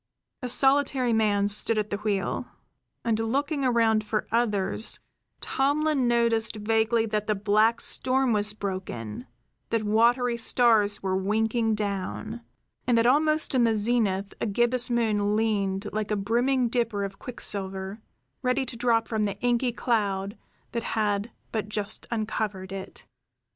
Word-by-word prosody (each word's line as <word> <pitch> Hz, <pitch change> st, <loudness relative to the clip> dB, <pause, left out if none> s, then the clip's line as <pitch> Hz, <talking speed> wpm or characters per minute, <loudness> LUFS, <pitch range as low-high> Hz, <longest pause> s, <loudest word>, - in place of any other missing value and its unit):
A 250 Hz, -, -3 dB
solitary 270 Hz, -2 st, +3 dB
man 205 Hz, -2 st, +2 dB
stood 210 Hz, +2 st, +2 dB
at 210 Hz, -1 st, -2 dB
the 205 Hz, -, -1 dB
wheel; 205 Hz, -2 st, -2 dB, 0.6 s
and, 225 Hz, -1 st, +1 dB
looking 280 Hz, +6 st, -1 dB
around 230 Hz, -3 st, +3 dB
for 215 Hz, 0 st, -2 dB
others, 215 Hz, -3 st, 0 dB, 0.4 s
Tomlin 285 Hz, -1 st, +1 dB
noticed 235 Hz, -2 st, +2 dB
vaguely 225 Hz, +2 st, +1 dB
that 210 Hz, -1 st, -2 dB
the 215 Hz, -, +1 dB
black 215 Hz, +3 st, +2 dB
storm 260 Hz, -1 st, +1 dB
was 210 Hz, 0 st, 0 dB
broken, 130 Hz, -, -5 dB, 0.4 s
that 230 Hz, -1 st, 0 dB
watery 235 Hz, +3 st, +2 dB
stars 225 Hz, -4 st, +3 dB
were 190 Hz, -1 st, 0 dB
winking 220 Hz, +3 st, 0 dB
down, 210 Hz, +3 st, -4 dB, 0.5 s
and 240 Hz, -2 st, +3 dB
that 230 Hz, -, +3 dB
almost 305 Hz, +5 st, +3 dB
in 255 Hz, -2 st, +3 dB
the 225 Hz, -1 st, +3 dB
zenith 205 Hz, -3 st, +1 dB
a -, -, 0 dB
gibbous 240 Hz, +4 st, +2 dB
moon 210 Hz, -3 st, +1 dB
leaned 205 Hz, -2 st, 0 dB
like 215 Hz, -1 st, -2 dB
a 210 Hz, -, +1 dB
brimming 240 Hz, +5 st, +1 dB
dipper 230 Hz, -4 st, -1 dB
of 195 Hz, 0 st, -6 dB
quicksilver, 195 Hz, -3 st, -3 dB, 0.4 s
ready 255 Hz, +1 st, 0 dB
to 250 Hz, -, -6 dB
drop 230 Hz, -1 st, +1 dB
from 220 Hz, -2 st, 0 dB
the 200 Hz, -1 st, -3 dB
inky 245 Hz, 0 st, +1 dB
cloud 205 Hz, -3 st, -1 dB, 0.4 s
that 235 Hz, -, -2 dB, 0.2 s
had 205 Hz, 0 st, 0 dB, 0.2 s
but 215 Hz, -2 st, -3 dB
just 210 Hz, 0 st, -2 dB
uncovered 215 Hz, -4 st, -3 dB
it. 195 Hz, 0 st, -8 dB
220 Hz, 145 wpm, -26 LUFS, 205-240 Hz, 0.6 s, solitary